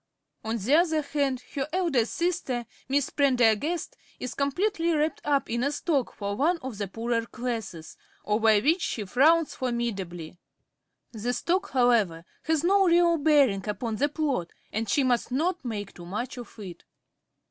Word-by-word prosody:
On 225 +1 -2
the 230 +7 0
other 320 -1 +3
hand, 280 -3 -1
her 270 -1 -2
elder 340 -7 +1
sister_, 265 -2 -2 0.2
Miss 280 0 +1
Prendergast, 270 +3 +2 0.2
_is 255 - -5
completely 340 +5 0
wrapped 305 +1 0
up 285 -2 +1
in 235 +1 -1
a 280 - +1
sock 290 -3 -1
for 200 -1 -3
one 325 - +2
of 250 -6 -6
the 205 - -2
poorer 230 +3 -2
classes, 225 -11 -5 0.3
over 215 0 +4
which 320 - +2
she 215 -10 -2
frowns 295 - +3
formidably. 195 -10 -4 0.7
The 235 +2 -3
sock, 350 - 0
however, 225 -10 +2 0.2
has 320 -1 +1
no 390 +2 +4
real 340 0 +4
bearing 280 -10 +3
upon 215 +2 -3
the 290 +5 +1
plot, 280 - -2 0.2
and 220 0 -2
she 280 - +3
must 250 -1 +1
not 335 +6 0
make 210 -5 -5
too 175 -1 -11
much 235 +9 -4
of 240 -1 -11
it. 190 -5 -9
255 Hz, 160 wpm, -27 LUFS, 220-305 Hz, 0.7 s, over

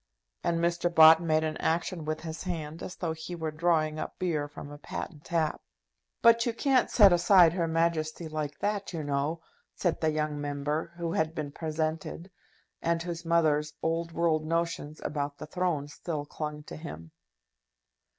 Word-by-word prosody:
And 170 -1 +1
Mr. 170 0 +1
Bott 160 0 +8
made 160 -2 +2
an 155 -1 -2
action 165 0 -1
with 155 0 -2
his 160 -1 -6
hand 165 -3 -5
as 180 - -6
though 165 -3 -2
he 160 +2 -7
were 160 -2 -3
drawing 155 -1 +1
up - - -5
beer 155 -5 -1
from 145 0 -10
a 145 - -10
patent 150 +1 -7
tap. 160 -3 0 0.6
"But 230 0 +7
you 235 - 0
can't 265 -1 +2
set 200 -5 +7
aside 175 -1 +6
Her 170 -2 0
Majesty 165 0 0
like 150 -2 -4
that, 205 -2 -1
you 160 -2 -3
know," 145 +3 -1 0.3
said 175 -3 -1
the 160 - +3
young 150 -1 -1
Member, 145 +3 -2
who 170 -1 -2
had 160 0 0
been 150 -2 -4
presented, 160 +3 -3 0.5
and 165 0 0
whose 170 -1 -5
mother's 155 -2 +2
old 165 +1 -1
world 165 -2 +1
notions 165 -2 -2
about 145 -1 -2
the - - -7
throne 160 -3 -1
still 150 0 -5
clung 150 0 -5
to - - -9
him. 80 - -9
160 Hz, 170 wpm, -29 LUFS, 150-170 Hz, 0.6 s, Bott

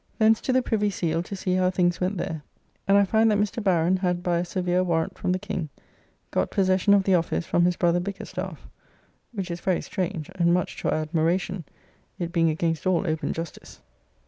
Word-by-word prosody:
Thence 220 0 +4
to - - -1
the 255 0 +3
Privy 210 -3 +1
Seal 165 -4 -1
to 190 +3 -6
see 185 -1 -2
how 185 0 +3
things 175 -1 +1
went 185 +2 0
there, 160 -2 -3 0.5
and 195 +1 +5
I 200 - +5
find 220 +3 +3
that 210 - +3
Mr. 210 +2 -1
Baron 180 -1 +3
had 180 -1 -1
by 175 -1 +1
a 175 - -1
severe 180 0 0
warrant 165 -2 0
from - - -1
the 185 - +1
King 170 -3 -4 0.6
got - - 0
possession 190 +1 +3
of 195 - +3
the 190 - +2
office 170 -1 +1
from 175 +1 +2
his 180 0 +2
brother 175 0 +2
Bickerstaffe, 195 +2 -6 0.7
which 195 -6 -4
is 170 - -4
very 185 -2 +1
strange, 175 -4 -4
and 170 -2 +3
much 180 - -2
to - - -2
our - - +1
admiration, 170 +3 -1 0.5
it 170 -1 -3
being 165 -2 +3
against 165 0 -1
all 185 0 +2
open 155 -2 -1
justice. 165 0 -7
180 Hz, 205 wpm, -25 LUFS, 170-195 Hz, 0.7 s, and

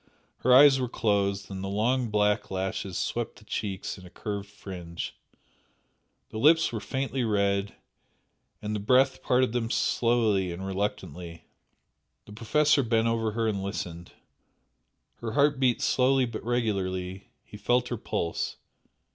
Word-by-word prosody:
Her 125 - +1
eyes 135 +1 +8
were 125 -2 -1
closed, 100 -4 0
and 95 0 -5
the - - -3
long 115 +5 0
black 105 0 +1
lashes 95 -1 -3
swept 120 -1 -2
the 110 - -17
cheeks 100 -2 -4
in 90 - -13
a - - -13
curved 100 +1 -5
fringe, 90 -4 -7 1.1
the 110 - -6
lips 160 +5 +5
were 110 - -2
faintly 130 +3 -2
red, 100 -2 0 0.9
and 105 0 -2
the - - -2
breath 130 +5 +3
parted 125 -1 +2
them 115 -2 -1
slowly 110 -7 +1
and 90 +3 -6
reluctantly. 90 -4 -4 0.8
The 105 - -12
Professor 145 +7 +3
bent 115 -2 +1
over 115 -2 0
her 115 0 0
and 100 -3 -1
listened, 90 -3 -5 1.0
her 115 -2 -5
heart 140 0 +3
beat 125 -3 +2
slowly 130 0 +3
but 115 -2 -6
regularly, 95 -6 -2
he - - -13
felt 120 +4 +1
her 120 - -2
pulse. 85 -4 -3
105 Hz, 145 wpm, -27 LUFS, 100-125 Hz, 1.1 s, eyes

